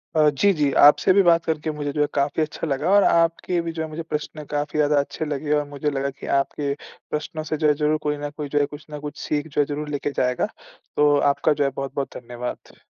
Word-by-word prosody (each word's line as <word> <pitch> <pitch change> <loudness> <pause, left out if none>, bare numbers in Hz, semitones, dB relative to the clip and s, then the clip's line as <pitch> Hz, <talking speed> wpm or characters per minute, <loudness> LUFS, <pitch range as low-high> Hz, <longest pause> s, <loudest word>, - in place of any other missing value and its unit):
अ, 155 -1 +5
जी, 175 +8 +3
जी। 150 -4 +1
आपसे 150 +5 +7
भी 200 - +6
बात 170 -1 +4
करके 155 -1 -1
मुझे 145 -1 -3
जो 150 - 0
है 145 - +3
काफ़ी 145 +2 0
अच्छा 155 +1 -3
लगा, 135 +4 -1
और 200 0 +6
आपके 170 +1 +2
भी 165 0 -4
जो 160 0 -5
हैं 160 - -5
मुझे 155 +2 -5
प्रश्न 155 -1 -5
काफ़ी 145 0 -2
ज़्यादा 150 -1 +3
अच्छे 140 +2 -3
लगे, 150 0 -3
और 150 0 +1
मुझे 145 +1 -2
लगा 140 -1 -1
की 140 - -10
आपके 140 +1 -2 0.4
प्रश्नों 155 +1 -3
से 155 0 -3
जो 155 0 +2
है 150 - +5
ज़रूर 150 +1 +1
कोई 150 0 0
न 145 0 -4
कोई 150 -2 -4
जो 145 - +1
है 145 - +3
कुछ 145 +1 -11
न 150 - -5
कुछ 145 0 -7
सीख 150 +1 -1
जो 150 -1 +1
है - - +2
ज़रूर 150 +1 -4
लेके 145 0 -2
जाएगा। 125 -2 0 0.5
तो 145 0 +4 0.2
आपका 150 - +1
जो 145 - 0
है 140 - +2
बहुत-बहुत 135 0 -4
धन्यवाद। 120 0 -7
150 Hz, 250 wpm, -23 LUFS, 145-155 Hz, 0.5 s, आपसे